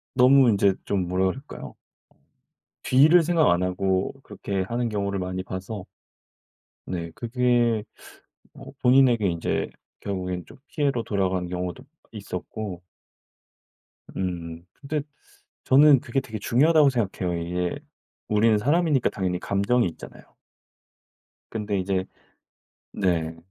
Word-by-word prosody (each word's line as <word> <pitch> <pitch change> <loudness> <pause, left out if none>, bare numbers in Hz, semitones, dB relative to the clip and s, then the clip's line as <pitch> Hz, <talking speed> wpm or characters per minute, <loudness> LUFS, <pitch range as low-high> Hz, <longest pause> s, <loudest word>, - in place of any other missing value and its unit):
너무 130 0 +6
인제 100 -2 +3
좀 95 -3 -1
뭐라 90 +1 +1
그럴까요? 95 - -5 1.1
뒤를 155 +7 +5
생각 165 -1 +3
안 85 +1 +1
하고 95 +1 0
그렇게 100 -1 -4
하는 120 +4 -2
경우를 100 -2 -2
많이 95 0 -3
봐서. 95 +2 -6 1.0
네 85 -2 -4
그게 120 0 +1 0.7
뭐 - - -12
본인에게 125 -4 +4
인제 85 -2 -1 0.3
결국엔 90 -3 -4
좀 - - -15
피해로 140 -6 0
돌아가는 95 -4 -1
경우도 90 0 -4 0.3
있었고 100 -2 -6 1.4
음 85 -2 -4
근데 150 +1 -4 0.6
저는 140 0 +6
그게 125 +2 -1
되게 110 -4 -7
중요하다고 145 +7 +4
생각해요. 95 -8 -2
이게 90 +1 -2 0.5
우리는 110 +1 +3
사람이니까 145 +3 +2
당연히 90 -2 -2
감정이 100 +5 +1
있잖아요. 80 - -12 1.3
근데 105 -2 -2
이제 95 0 -1 0.9
네 85 -4 -1
100 Hz, 255 characters per minute, -25 LUFS, 90-125 Hz, 1.4 s, 너무